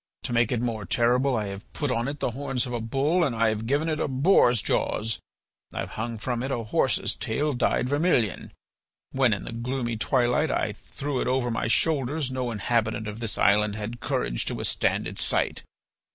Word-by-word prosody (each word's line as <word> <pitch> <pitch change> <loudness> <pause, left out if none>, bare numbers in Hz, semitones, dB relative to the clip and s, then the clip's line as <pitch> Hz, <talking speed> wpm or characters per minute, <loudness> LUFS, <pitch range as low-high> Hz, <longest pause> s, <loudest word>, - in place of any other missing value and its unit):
To - - -3
make 115 -1 +3
it 120 -2 0
more 115 -3 -2
terrible 120 +3 +2
I 105 - -1
have 100 +1 -9
put 145 -3 -1
on 120 0 0
it 145 +1 -4
the - - 0
horns 135 0 -2
of 125 - -5
a 120 - -1
bull 140 +10 +1
and 135 -7 0
I 115 0 +3
have 110 +1 -3
given 145 +5 +1
it 155 -1 -1
a - - 0
boar's 130 - +4
jaws; 110 +3 0 0.5
I - - -3
have - - -6
hung 115 +1 -4
from 120 +2 -2
it 135 - -2
a 120 -4 -2
horse's 110 - +1
tail 145 +6 -1
dyed 125 0 +1
vermilion. 145 - +1 0.6
When 130 -3 +3
in 100 -2 -1
the - - -6
gloomy 120 0 -2
twilight 125 +1 +2
I - - 0
threw 140 -2 -4
it - - -1
over 125 -1 +1
my 115 - -1
shoulders 140 +1 +1
no 130 -1 -2
inhabitant 110 0 0
of 105 +1 -6
this 115 -4 -1
island 105 +1 +3
had 110 +3 -5
courage - - -1
to - - -2
withstand - - 0
its - - -3
sight. - - 0
120 Hz, 205 wpm, -26 LUFS, 115-135 Hz, 0.6 s, boar's